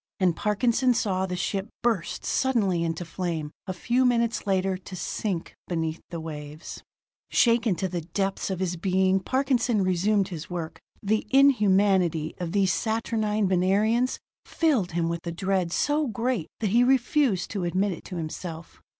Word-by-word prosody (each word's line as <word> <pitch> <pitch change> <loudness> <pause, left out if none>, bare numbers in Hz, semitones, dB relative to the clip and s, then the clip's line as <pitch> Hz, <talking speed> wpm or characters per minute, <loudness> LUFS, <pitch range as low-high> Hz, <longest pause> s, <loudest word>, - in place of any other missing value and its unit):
And 180 -3 +3
Parkinson 235 +4 +2
saw 190 -3 0
the 180 - -3
ship 195 +3 -2
burst 225 -8 -1
suddenly 205 -10 +1
into 165 +1 -2
flame, 165 -3 -3 0.2
a - - -1
few 240 +8 +1
minutes 235 -3 +1
later 190 -1 +1
to 185 0 -9
sink 180 +1 -3
beneath 165 -2 -2
the 170 - -5
waves. 150 -1 -8 0.5
Shaken 230 -4 +3
to 190 - -2
the 175 -1 -3
depths 195 +5 -2
of 190 -1 -3
his 180 -1 -1
being, 190 +2 +2
Parkinson 245 -1 +1
resumed 190 +2 +1
his 165 -4 -7
work. 170 -3 -5 0.2
The 215 +2 0
inhumanity 195 - +3
of 175 -2 -3
these 195 -1 +2
saturnine 220 -2 0
Venerians 205 +7 +2 0.3
filled 260 - 0
him 170 -1 0
with 170 0 -4
a - - -1
dread 185 0 -1
so 295 - +1
great 235 -6 -1
that 210 -4 0
he 240 +3 +5
refused 255 - +2
to 200 -4 -2
admit 185 +4 +1
it 175 - -7
to 185 - -7
himself. 165 0 -6
190 Hz, 160 wpm, -26 LUFS, 175-225 Hz, 0.5 s, he